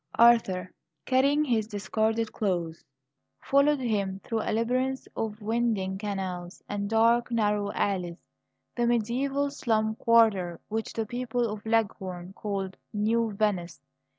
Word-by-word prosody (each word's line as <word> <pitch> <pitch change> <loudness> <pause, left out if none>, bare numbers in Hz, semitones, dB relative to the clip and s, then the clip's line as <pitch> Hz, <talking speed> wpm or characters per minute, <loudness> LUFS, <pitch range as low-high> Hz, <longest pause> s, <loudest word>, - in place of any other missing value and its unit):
Arthur, 210 -6 +4 0.3
carrying 280 +4 +3
his 225 -5 +1
discarded 220 +1 -1
clothes, 175 -5 -2 0.6
followed 280 +1 +3
him 200 -6 -1
through 225 -1 -2
a - - -3
labyrinth 255 +4 0
of 215 -1 -3
winding 215 -4 0
canals 190 -4 -4
and 200 0 -3
dark 230 +2 +3
narrow 210 -3 +1
alleys; 180 -4 -1 0.6
the 240 -1 +1
mediaeval 265 +5 0
slum 220 -5 0
quarter 210 -7 +3
which 220 +1 -3
the 225 - -2
people 245 +1 -1
of 210 -1 -6
Leghorn 190 -5 -1
call 195 -2 -3 0.2
"New 220 +1 +1
Venice." 195 -5 -1
220 Hz, 125 wpm, -28 LUFS, 195-235 Hz, 0.6 s, Arthur